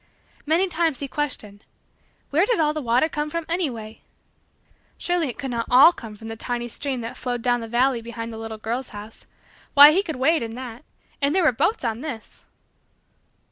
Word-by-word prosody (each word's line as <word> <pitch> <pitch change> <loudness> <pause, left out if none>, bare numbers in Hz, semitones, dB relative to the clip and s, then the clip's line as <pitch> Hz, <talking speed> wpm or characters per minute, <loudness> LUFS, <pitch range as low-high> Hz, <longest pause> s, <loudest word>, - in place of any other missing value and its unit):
Many 335 +5 +3
times, 325 -5 0
he 280 - -4
questioned: 220 -9 -4 0.7
"Where 330 +8 +3
did 475 -6 +1
all 305 -1 +2
the 305 - -3
water 245 +4 +2
come 300 -1 -3
from 335 +1 -3
anyway?" 245 -11 -3 1.0
Surely 350 -4 0
it 240 - -7
could 270 -2 -4
not 230 -1 -2
all 270 +8 +8
come 225 -7 -10
from 225 +2 -11
the 225 - -5
tiny 240 +1 -3
stream 265 +1 -4
that 230 - -6
flowed 245 -2 -3
down 245 -1 +2
the 225 - -6
valley 240 +1 +2
below 230 0 -6
the 230 -1 -7
little 225 0 -6
girl's 235 +4 -4
house! 210 +2 -11 0.5
Why, 290 +1 +11
he 365 +5 +3
could 325 -6 -5
wade 310 +5 +2
in 225 -1 -5
that 245 0 -8 0.4
and 285 +4 +1
there 375 - +3
were 310 - +5
boats 330 - 0
on 230 0 -2
this! 260 -8 -8
255 Hz, 195 wpm, -23 LUFS, 230-310 Hz, 1.0 s, Why